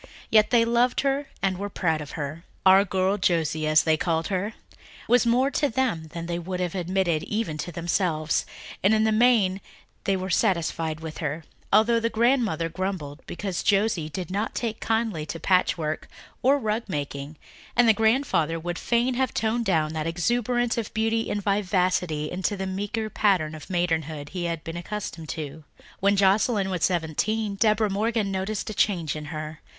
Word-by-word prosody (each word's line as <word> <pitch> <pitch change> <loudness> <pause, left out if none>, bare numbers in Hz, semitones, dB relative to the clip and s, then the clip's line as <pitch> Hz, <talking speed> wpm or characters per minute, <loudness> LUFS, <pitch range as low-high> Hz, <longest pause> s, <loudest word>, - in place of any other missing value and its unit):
Yet 215 -1 +5
they 235 -2 +4
loved 240 +2 +2
her 275 +1 0 0.2
and 190 -1 +1
were 205 0 -3
proud 160 -5 0
of 150 - -8
her. 155 +2 -5 0.2
"Our 190 +1 +7
girl 190 +1 0
Josie," 160 -4 +1
as 155 0 +5
they 160 -1 +3
called 165 0 -1
her, 200 +3 -1 0.5
was 245 -1 +4
more 255 +4 +3
to 290 - +1
them 225 -10 -1
than 165 +1 -6
they 170 0 -2
would 180 +1 -4
have 180 -2 -1
admitted 180 -3 0
even 210 -7 -2
to 175 - -4
themselves, 170 -2 0 0.4
and 205 +3 +4
in 215 - +3
the 220 - +3
main 215 -4 +3 0.4
they 195 -1 +2
were 185 0 -4
satisfied 165 -5 0
with 160 -1 -7
her, 155 +1 -3 0.3
although 225 +3 +5
the 230 0 0
grandmother 230 - +2
grumbled 165 -4 -4
because 185 -2 -3
Josie 195 -6 +1
did 180 +2 -5
not 205 +3 -2
take 225 -2 -2
kindly 225 -8 0
to 165 - -5
patchwork 165 -4 +1 0.4
and 275 +1 +3
rug 215 +1 0
making 145 -3 -4 0.4
and 245 - +5
the 225 - +7
grandfather 220 - +1
would 175 +1 -4
fain 240 +2 +1
have 260 +1 -1
toned 225 +1 0
down 160 -5 +1
that 155 0 -2
exuberance 240 +7 0
of 220 - -4
beauty 225 +1 0
and 205 -1 -2
vivacity 180 -6 0
into 190 +3 -1
the 190 - -3
meeker 205 +4 -3
pattern 190 -7 +1
of 155 -2 -10
maidenhood 160 -5 -1
he 180 0 -4
had 165 -2 -3
been 165 +1 -6
accustomed 175 -3 -6
to. 155 0 -6 0.4
When 200 +1 +3
Joscelyn 195 +1 +3
was 180 -3 -2
seventeen 195 +5 0
Deborah 215 0 +2
Morgan 215 0 0
noticed 195 +2 -2
a - - -5
change 175 -8 +1
in 155 0 -6
her. 155 0 -6
190 Hz, 175 wpm, -25 LUFS, 165-220 Hz, 0.5 s, Our